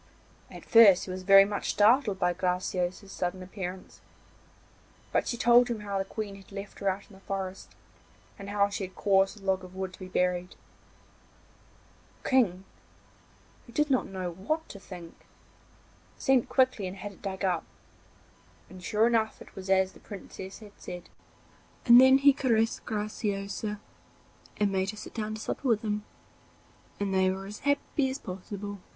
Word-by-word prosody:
At - - -11
first 210 -5 +7
he 185 - -6
was 185 0 -5
very 195 +1 +8
much 205 0 -3
startled 215 0 +4
by 180 -1 +1
Graciosa's 180 +1 -2
sudden 185 0 -3
appearance, 185 -1 -7 1.1
but - - +1
she 235 - -2
told 240 +1 +6
him 235 -3 -3
how 200 -1 -2
the 195 - -1
Queen 210 0 -5
had 195 - -17
left 200 0 -8
her 200 - +1
out 195 +1 -3
in 215 - -18
the 190 - -15
forest, 195 -1 -5 0.6
and 200 0 -7
how 200 0 +3
she 200 0 -4
had 185 - -13
caused 195 0 +2
a 195 - -14
log 190 -1 +1
of 185 0 -11
wood 190 -1 -4
to - - -13
be 185 - -7
buried. 180 0 -1 1.7
The - - -4
King, 195 -8 +3 1.0
who 235 - -14
did 300 -1 +1
not 260 - +2
know 185 -2 -4
what 310 - -3
to 200 - -9
think, 175 -4 -10 1.0
sent 265 -3 +2
quickly 255 -7 +2
and 185 +2 -7
had 205 +2 -6
it 195 - -18
dug 195 -1 -3
up, 180 -3 0 1.1
and 185 -1 -11
sure 215 +4 +2
enough 225 -2 +1
it - - -14
was 190 0 -8
as 190 0 +3
the - - -17
Princess 190 -1 -9
had 210 -2 -13
said. 180 -1 -9 0.7
Then 260 +2 +8
he 280 +1 +6
caressed 230 -5 0
Graciosa, 210 -1 -3 0.8
and 205 -1 +1
made 190 0 0
her 215 - -6
sit - - -9
down 215 -1 -3
to 215 - -8
supper 270 - -3
with 225 -3 +2
him, 210 -1 -2 0.9
and 200 -1 -1
they 190 0 +3
were 190 +1 -4
as 205 +2 -8
happy 285 0 0
as 260 - -3
possible. 200 -1 -7
200 Hz, 170 wpm, -29 LUFS, 190-220 Hz, 1.7 s, very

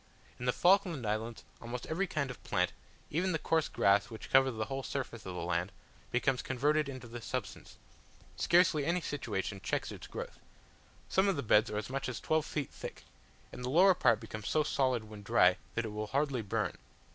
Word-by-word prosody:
In 125 - -4
the 125 - +4
Falkland 175 - +3
Islands 110 +2 -2 0.2
almost 120 +1 -5
every 185 +5 -1
kind 140 -5 -2
of 125 - -12
plant, 90 0 +1 0.4
even 180 +4 +1
the - - +2
coarse 160 0 +1
grass 100 +3 +3
which 110 -2 -9
covers 135 -2 +5
the 110 - -1
whole 135 +2 -3
surface 120 -7 -5
of 90 - -5
the - - -3
land, 90 +2 -1 0.4
becomes 125 +1 +1
converted 145 +3 +1
into 130 -3 -7
this 120 0 -8
substance: 125 -7 -5 0.6
scarcely 170 -4 +4
any 170 +5 +1
situation 105 - -3
checks 90 - -2
its - - -9
growth; - - -7 0.7
some 190 +1 +3
of 195 - +2
the 140 - -2
beds 110 0 +4
are 105 - -3
as 105 +4 -4
much 135 -1 -2
as 125 - -4
twelve 155 -1 +1
feet 145 -3 -3
thick, - - -8 0.5
and 125 - -8
the 125 - -2
lower 185 +7 +6
part 115 -10 +3
becomes 110 -2 -6
so 155 - +3
solid 130 -5 +1
when 105 -1 -10
dry, 90 -2 +4 0.2
that 115 - 0
it - - -3
will 105 0 -4
hardly 135 0 0
burn. 100 - -2
125 Hz, 200 wpm, -32 LUFS, 110-150 Hz, 0.7 s, lower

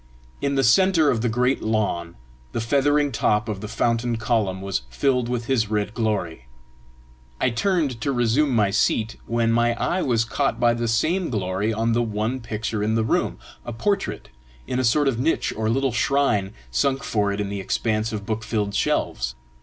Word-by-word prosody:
In 140 0 0
the 135 - +2
centre 160 +4 +4
of 115 - -1
the 120 - +1
great 125 +4 +1
lawn 100 -6 -1 0.4
the - - -1
feathering 145 +5 +2
top 105 -1 +1
of 105 -3 -4
the 105 - -5
fountain 115 +2 0
column 110 -5 0
was 95 -8 -2
filled 125 - 0
with 120 -1 -2
his 115 -5 +1
red 105 0 -1
glory. 95 - -2 0.9
I 125 - +2
turned 140 - 0
to 140 - 0
resume 125 +4 +2
my 105 -6 +2
seat, 110 +2 +1
when 115 0 +1
my 120 0 +2
eye 180 +9 -1
was 115 -6 +1
caught 135 +4 -1
by 120 -1 +4
the 120 0 -2
same 165 +11 +1
glory 100 -1 -1
on 115 +1 0
the 120 - +2
one 110 +3 -2
picture 110 -2 -3
in 110 +1 +1
the 115 - +2
room 110 - 0 0.3
a 120 - -6
portrait, 200 - -2 0.4
in 125 - -2
a - - +1
sort 140 +5 +3
of 125 -4 0
niche 160 +6 0
or 110 0 -1
little 135 +3 +1
shrine 120 -6 +1 0.2
sunk 135 -1 +1
for 105 -2 0
it 100 - -3
in 100 -1 -2
the 100 0 -4
expanse 110 +3 -1
of 105 -2 -5
book 110 +1 -3
filled 105 -2 -2
shelves. 65 -10 -1
115 Hz, 190 wpm, -23 LUFS, 105-130 Hz, 0.9 s, centre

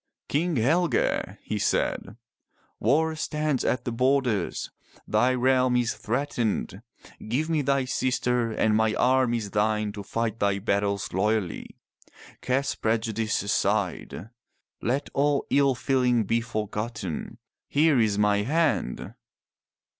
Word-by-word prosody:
"King 165 +3 0
Helge,'' 145 +4 +1
he - - -3
said, - - -1 0.6
War 160 +7 +2
stands 150 -3 -1
at 130 - -1
the 120 - -2
borders. 125 -5 0 0.4
Thy 130 +1 +2
realm 130 0 +3
is 120 -1 +1
threatened. 115 -5 -2 0.5
Give 150 +9 -1
me 155 -2 +2
thy 140 -1 +1
sister 125 -2 0
and 110 0 +1
my 110 0 +2
arm 130 -1 +3
is 105 -4 -4
thine 105 0 +1
to 100 0 -7
fight 115 +2 -3
thy 100 -1 +1
battles 100 0 -1
loyally. 100 -1 -1 0.6
Cast 135 +2 -1
prejudice 110 -1 0
aside. 100 0 -1 0.5
Let 135 +5 -1
all 145 0 +1
ill 140 -2 +3
feeling 125 -3 +2
be 115 +3 0
forgotten. 105 -5 -4 0.3
Here 150 -2 +3
is 105 -3 +2
my 105 0 +3
hand.'' 125 - 0
120 Hz, 120 wpm, -26 LUFS, 105-135 Hz, 0.6 s, realm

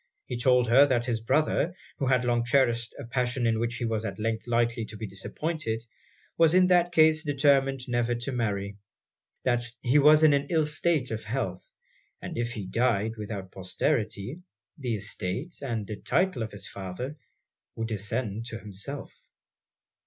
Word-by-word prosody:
He 125 - -4
told 125 0 +4
her 135 +5 +7
that 120 -3 +1
his 115 -3 -1
brother, 155 +7 +1 0.2
who 135 - 0
had 125 -1 +3
long 120 -1 +2
cherished 120 -2 +2
a - - -7
passion 125 +1 -1
in 115 -1 +2
which 120 +1 -1
he 120 - -2
was 110 -1 -1
at 110 - -4
length 110 +1 -2
likely 115 -1 +1
to 110 - -10
be 110 - -5
disappointed, 115 - -3 0.5
was 165 +1 +5
in 185 0 +6
that 175 -1 +4
case 160 -1 +5
determined 135 -2 +2
never 120 -1 +1
to 120 +4 -4
marry; 100 -5 -2 0.7
that 120 -1 +2 0.2
he 130 +4 +4
was 150 +2 +7
in 155 -2 +7
an 140 0 +1
ill 160 -3 +2
state 150 -3 0
of 110 0 -4
health; 130 +5 -3 0.6
and 180 -2 -7
if 120 -2 -2
he 105 -4 -5
died 115 +1 +1
without 100 -3 -6
posterity, 105 - -2 0.3
the 125 -7 -2
estate 105 - -4
and 115 -7 -3 0.2
title 185 -10 +1
of 110 - -3
his 100 - -7
father 100 +9 -6 0.6
would 115 0 -3
descend 110 +1 -2
to 115 - -5
himself. 105 +8 -6
120 Hz, 165 wpm, -28 LUFS, 110-140 Hz, 0.7 s, her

